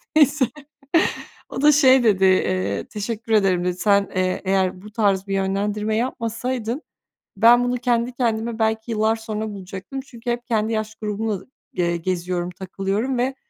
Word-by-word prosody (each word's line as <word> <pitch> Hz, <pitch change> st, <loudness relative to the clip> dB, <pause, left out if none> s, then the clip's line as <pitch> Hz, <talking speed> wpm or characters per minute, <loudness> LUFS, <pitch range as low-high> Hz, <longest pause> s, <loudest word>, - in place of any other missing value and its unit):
Neyse. 295 Hz, -2 st, +5 dB, 1.0 s
O -, -, -4 dB
da 300 Hz, +1 st, +7 dB
şey 265 Hz, -3 st, +6 dB
dedi, 195 Hz, -4 st, +4 dB
eee, 100 Hz, -, +1 dB
"teşekkür 225 Hz, +2 st, -5 dB
ederim" 195 Hz, -4 st, +3 dB
dedi. 180 Hz, -, +1 dB
"Sen, 200 Hz, 0 st, +3 dB
eee, 185 Hz, 0 st, 0 dB
eğer 185 Hz, -1 st, +1 dB
bu 210 Hz, -, -11 dB
tarz 200 Hz, -3 st, +1 dB
bir 195 Hz, -, -2 dB
yönlendirme 205 Hz, +2 st, -1 dB
yapmasaydın 235 Hz, +2 st, -2 dB, 0.6 s
ben 235 Hz, +3 st, +6 dB
bunu 245 Hz, 0 st, 0 dB
kendi 240 Hz, 0 st, 0 dB
kendime 230 Hz, -2 st, -1 dB
belki 220 Hz, +1 st, 0 dB
yıllar 220 Hz, 0 st, +2 dB
sonra 220 Hz, -1 st, -4 dB
bulacaktım. 195 Hz, +5 st, -7 dB
Çünkü 245 Hz, -2 st, -8 dB
hep 240 Hz, 0 st, -3 dB
kendi 220 Hz, -1 st, 0 dB
yaş 215 Hz, 0 st, -3 dB
grubumla, 210 Hz, -2 st, -3 dB, 0.3 s
eee, 170 Hz, -2 st, 0 dB
geziyorum, 175 Hz, 0 st, -2 dB
takılıyorum 195 Hz, +7 st, -2 dB
ve 255 Hz, +2 st, 0 dB
215 Hz, 150 wpm, -22 LUFS, 190-235 Hz, 1.0 s, da